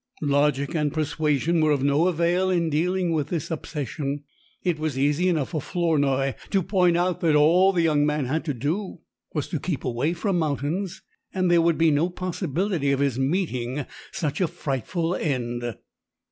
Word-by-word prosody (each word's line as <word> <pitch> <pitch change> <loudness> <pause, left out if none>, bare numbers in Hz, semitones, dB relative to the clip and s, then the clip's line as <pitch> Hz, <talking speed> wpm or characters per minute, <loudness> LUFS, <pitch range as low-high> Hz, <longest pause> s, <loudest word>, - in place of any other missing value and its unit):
Logic 145 0 +1
and 150 -3 0
persuasion 155 +1 0
were 155 - +3
of 140 -3 +2
no 145 +5 +3
avail 175 +2 +1
in 170 -3 +1
dealing 180 +3 +1
with 155 -4 0
this 170 -2 -3
obsession. 145 -2 -4 0.4
It 175 -4 0
was 155 -4 -2
easy 145 +6 +2
enough 155 -6 0
for 155 -4 -2
Flournoy 140 -5 +1 0.2
to 195 -2 +1
point 180 -2 +3
out 180 0 0
that 160 -3 +3
all 170 +6 +5
the 175 -3 +1
young 150 -3 +3
man 150 -1 0
had 155 +6 -1
to 150 - -1
do 165 - -3 0.3
was 150 - -1
to 160 - -2
keep 160 -1 -3
away 130 +6 0
from 175 +1 0
mountains, 165 +6 -2 0.3
and 185 -2 +2
there 170 -1 +5
would 165 -1 +2
be 165 -1 +4
no 150 +5 +2
possibility 180 -3 -1
of 135 - +1
his 140 -3 0
meeting 135 -4 -1 0.3
such 150 +2 -2
a 180 - +3
frightful 165 +5 -2
end. 120 - -2
155 Hz, 175 wpm, -25 LUFS, 140-175 Hz, 0.4 s, all